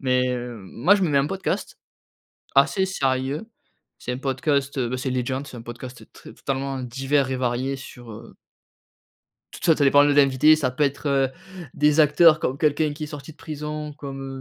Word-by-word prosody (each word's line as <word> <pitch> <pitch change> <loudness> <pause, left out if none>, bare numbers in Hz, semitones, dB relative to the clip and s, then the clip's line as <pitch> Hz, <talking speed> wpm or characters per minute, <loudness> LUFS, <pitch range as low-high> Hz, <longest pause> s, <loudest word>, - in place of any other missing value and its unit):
Mais, 130 -1 +1
heu, 120 -1 -4
moi 115 - +2
je 200 - 0
me 180 - +2
mets 140 - +3
un 140 - +2
podcast, 190 +4 -3 0.8
assez 160 +8 +4
sérieux, 135 0 -1 0.5
c'est 125 - -5
un - - -4
podcast, 140 0 -1
heu, 125 -3 0
bah, 130 - -3
c'est 130 0 -3
Legend, 130 +2 -2
c'est 125 - -10
un 115 - -8
podcast, 120 +1 -9
heu, - - -15
tr - - -17
totalement 135 0 -3
divers 135 +2 0
et 130 - -1
varié 130 +2 -1
sur 120 -3 -11
heu 115 +2 -12 1.2
tout - - -10
t - - -5
ça 165 -2 +5
ça 145 - +2
dépend 145 +1 +6
de 145 - +3
l'invité, 145 +2 +5
ça 140 -5 -1
peut 135 +4 0
être, 140 +1 -1
heu, 135 -1 +2 0.4
des 150 +1 +2
acteurs, 155 +1 +6
comme 135 -4 -2
quelqu'un 150 0 +1
qui 155 - -7
est - - -4
sorti 150 +1 -9
de - - -21
prison, 150 0 -6
comme, 135 -2 -7
135 Hz, 205 wpm, -23 LUFS, 130-150 Hz, 1.2 s, dépend